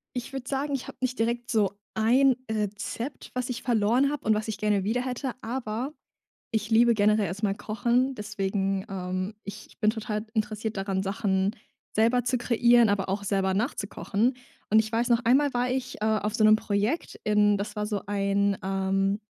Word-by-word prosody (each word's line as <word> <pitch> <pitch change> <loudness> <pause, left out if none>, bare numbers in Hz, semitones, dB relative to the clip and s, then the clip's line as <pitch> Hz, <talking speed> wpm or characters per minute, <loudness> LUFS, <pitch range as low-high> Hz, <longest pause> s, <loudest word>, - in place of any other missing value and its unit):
Ich 245 +2 -5
würde 260 -2 -5
sagen, 280 +1 -1
ich 265 - -5
habe - - -10
nicht 255 0 -1
direkt 235 +1 -1
so 205 -3 +1
ein 250 +4 +4 0.2
Rezept, 215 +5 -4
was 250 0 -2
ich 240 -1 -4
verloren 240 +4 +2
hab 295 - -5
und 220 - +4
was 215 +1 -2
ich 215 - -3
gerne 205 -1 +1
wieder 225 +5 0
hätte, 255 +1 -3
aber 240 +3 -3 0.6
ich 220 0 -2
liebe 235 +1 +5
generell 210 0 +3
erst 185 +5 -6
mal 195 -2 +1
Kochen, 240 +5 0
deswegen, 195 -2 -2
ähm, 185 +1 -3
ich 200 - -10
bin 215 - +4
total 215 -1 -4
interessiert 215 0 -2
daran, 195 -1 -1
Sachen 195 +1 0 0.4
selber 230 +3 +3
zu 250 0 +1
kreieren, 235 -1 +4
aber 200 -1 0
auch 200 +2 -2
selber 190 -1 +1
nachzukochen. 220 +2 -1 0.3
Und 220 - +6
ich 220 0 +1
weiß 235 +2 0
noch 235 -1 +4
einmal 270 +4 +4
war 245 0 0
ich, 260 0 -3
äh, - - -1
auf 215 0 0
so 220 - +2
'nem 215 0 +7
Projekt 210 +9 -2
in 210 -1 +4
das 210 +2 -5
war 210 0 -1
so 210 -2 -2
ein, 200 0 +1
ähm, 195 +1 0
215 Hz, 185 wpm, -27 LUFS, 200-240 Hz, 0.6 s, nem